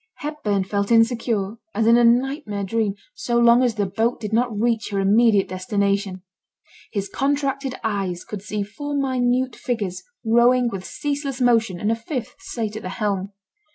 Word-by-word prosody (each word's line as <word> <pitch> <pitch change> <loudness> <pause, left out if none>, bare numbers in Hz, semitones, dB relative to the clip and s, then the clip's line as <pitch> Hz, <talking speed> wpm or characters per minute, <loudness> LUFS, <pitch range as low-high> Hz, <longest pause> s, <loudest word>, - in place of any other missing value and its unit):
Hepburn 225 -10 -2
felt 200 +2 -2
insecure, 225 -3 +2 0.2
as 225 - +1
in 230 +1 +6
a 240 - +5
nightmare 240 -3 +1
dream, 210 0 0 0.2
so 240 - -1
long 235 +1 +6
as 245 -3 +1
the 205 -2 0
boat 220 +5 0
did 215 -1 -5
not 240 +2 +2
reach 230 -1 0
her 200 -2 -1
immediate 205 +1 +4
destination. 195 0 -1 0.7
His 200 -2 -2
contracted 275 0 -1
eyes 195 -5 -2
could 210 -3 -6
see 210 0 -3
four 290 +8 -5
minute 255 -2 +1
figures 210 -8 -3 0.2
rowing 240 +2 +4
with 190 -4 -6
ceaseless 285 -2 -3
motion, 230 -7 +2
and 210 +3 0
a - - +2
fifth 235 +1 -5
sate 220 -3 -4
at 220 - -5
the 185 - -5
helm. 200 -3 -2
225 Hz, 165 wpm, -22 LUFS, 200-245 Hz, 0.7 s, in